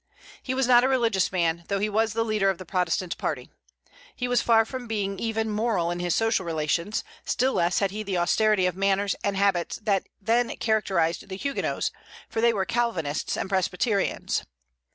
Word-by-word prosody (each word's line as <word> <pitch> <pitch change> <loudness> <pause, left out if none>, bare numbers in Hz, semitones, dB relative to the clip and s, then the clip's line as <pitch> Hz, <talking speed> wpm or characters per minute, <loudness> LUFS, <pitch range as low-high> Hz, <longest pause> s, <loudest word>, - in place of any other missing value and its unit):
He 260 - -3
was 265 0 +2
not 245 0 +6
a - - +4
religious 230 -8 +2
man, 170 -2 +1
although 195 +4 -3
he 205 +2 0
was 220 +1 +1
the 225 0 0
leader 215 -3 +2
of 190 - -1
the 185 - -9
Protestant 180 0 -1
party. 130 -6 -3 0.6
He 250 - -2
was 245 0 +2
far 225 -1 +4
from 255 +1 -6
being 200 -3 -2
even 225 -1 -1
moral 210 -5 0
in 175 - -3
his 175 -1 0
social 225 -3 +1
relations; 170 +4 -1 0.2
still 260 +2 +1
less 175 +1 +1
had 200 -2 +1
he 210 +2 -4
the 195 -3 -2
austerity 205 +2 +3
of 180 -1 0
manners 195 +1 +1
and 200 -1 0
habits 195 -3 +1
that 200 -3 0
then 230 +3 +1
characterized 195 -6 0
the 190 - -5
Huguenots, 280 +6 -2 0.4
for 225 - -2
they 235 0 +5
were 195 -4 -1
Calvinists 200 -12 -1
and - - -2
Presbyterians. 195 +2 0
200 Hz, 190 wpm, -26 LUFS, 180-225 Hz, 0.6 s, not